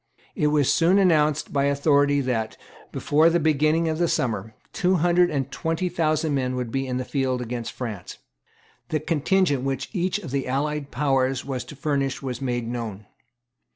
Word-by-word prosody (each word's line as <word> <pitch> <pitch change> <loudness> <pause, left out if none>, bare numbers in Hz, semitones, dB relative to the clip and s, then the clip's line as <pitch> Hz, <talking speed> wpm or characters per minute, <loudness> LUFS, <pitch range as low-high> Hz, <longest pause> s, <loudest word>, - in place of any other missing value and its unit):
It 150 - +1
was 150 -3 +3
soon 175 +4 +4
announced 155 -6 +2
by 140 -1 +2
authority 140 0 +3
that, 115 -4 -2 0.3
before 155 +3 +3
the 170 +1 +2
beginning 155 +1 +2
of 160 +2 0
summer, 110 -3 -2 0.2
two 180 +1 +2
hundred 175 +1 +3
and 140 -2 -2
twenty 165 +2 -2
thousand 155 -2 0
men 130 -2 -1
would 125 -2 -3
be 135 +1 -2
in 125 -1 -2
the 130 - -3
field 130 -2 -1
against 120 -1 -4
France. 110 -7 -6 0.7
The 155 - 0
contingent 155 -1 +1
which 135 0 -3
each 185 0 0
of 210 - -8
the 140 0 -1
allied 145 +2 -2
powers 135 -1 0
was 130 -3 -3
to 150 - -10
furnish 140 -1 -1
was 130 -2 -5
made 120 -3 -2
known. 115 -4 -5
140 Hz, 170 wpm, -24 LUFS, 130-160 Hz, 0.7 s, soon